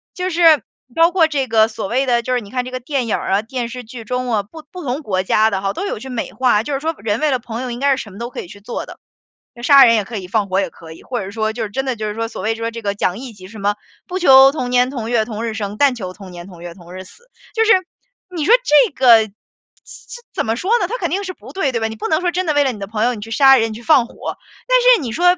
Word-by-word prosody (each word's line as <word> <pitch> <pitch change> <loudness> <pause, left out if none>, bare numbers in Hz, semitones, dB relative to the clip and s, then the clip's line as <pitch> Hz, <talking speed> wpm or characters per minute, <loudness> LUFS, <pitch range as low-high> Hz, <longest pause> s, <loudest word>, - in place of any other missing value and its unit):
就 365 +1 -2
是 330 -3 +5 0.3
包 335 +1 +4
括 345 -3 +4
这 285 -4 -1
个 220 -1 +4
所 220 -3 -5
谓 260 +4 0
的， 240 -1 +2
就 255 - -2
是 245 - 0
你 200 - -12
看 250 +1 -2
这 255 - -7
个 255 - -4
电 260 0 -2
影 225 - 0
儿 - - -5
啊、 200 - +3
电 240 0 -4
视 250 +1 -7
剧 230 +1 -10
中 250 +1 -3
啊， 210 - +2
不 305 +11 -13
不 360 -2 -8
同 265 +3 -3
国 190 -6 -1
家 215 +3 +2
的 190 -1 -2
哈， 195 0 -1
都 395 - -4
有 300 - -4
去 265 +2 -9
美 245 -3 -4
化， 245 -5 +2
就 285 +4 -4
是 270 - -1
说 320 +2 -2
人 210 0 -2
为 305 0 +1
了 260 - +1
朋 230 0 -7
友 255 - -4
应 240 0 -5
该 275 0 +3
是 - - -5
什 215 - -10
么 195 - -13
都 235 +2 -6
可 - - -6
以 - - -11
去 200 - -13
做 235 - -6
的， - - -12 0.6
呃， 240 - -11
杀 275 +2 +7
人 230 -1 +6
也 210 - 0
可 225 - -8
以， 185 -2 -7
放 205 -1 0
火 190 +1 +1
也 190 - -3
可 165 -1 -13
以， - - -15
或 245 -2 -4
者 195 - -5
是 195 - -8
说 220 -1 -1
就 225 +1 -4
是 215 - -4
真 265 +6 -3
的 255 -4 -2
就 215 0 -3
是 210 - -4
说， 225 0 -3
所 - - -7
谓 220 +3 -1
说 230 0 -4
这 230 - -7
个 200 -2 -2
讲 185 -2 -1
义 255 -3 -8
气， 185 -2 -13
什 215 +1 -11
么 205 +1 0 0.3
“不 370 +1 -3
求 270 -5 +7
同 255 -5 -3
年 250 0 +3
同 235 -4 -5
月 230 -3 +1
同 220 -1 -5
日 225 - -3
生， 205 -2 -4
但 275 -1 +3
求 185 -5 -6
同 190 -1 -12
年 175 +1 -10
同 175 -3 -13
月 175 -1 -8
同 175 -1 -14
日 185 - -7
死。” 475 - -20 0.2
就 450 0 +2
是 450 - +6 0.6
你 315 -4 -2
说 450 - +5
这 370 +4 +4
个 235 -5 +5 0.6
怎 480 +1 -12
怎 - - -2
么 225 - 0
说 370 - -3
呢， 360 - 0
它 - - -4
肯 - - -2
定 395 +2 -2
是 370 - -5
不 - - -14
对， 315 -9 0
对 230 - -1
吧？ 225 - +1
你 220 - -7
不 - - -3
能 320 +2 +1
说 355 - 0
真 365 +1 -1
的 305 - +1
为 290 0 +3
了 265 - 0
你 215 - -9
的 195 - -6
朋 215 0 -2
友， 250 - +1
你 - - -9
去 225 - -9
杀 270 +2 +6
人、 225 -1 0
你 - - -7
去 230 - -10
放 265 -6 +4
火。 - - -7 0.3
但 - - +4 0.2
是 - - -3
你 240 -5 -4
说， 355 +5 +3
240 Hz, 350 characters per minute, -18 LUFS, 215-280 Hz, 0.6 s, 杀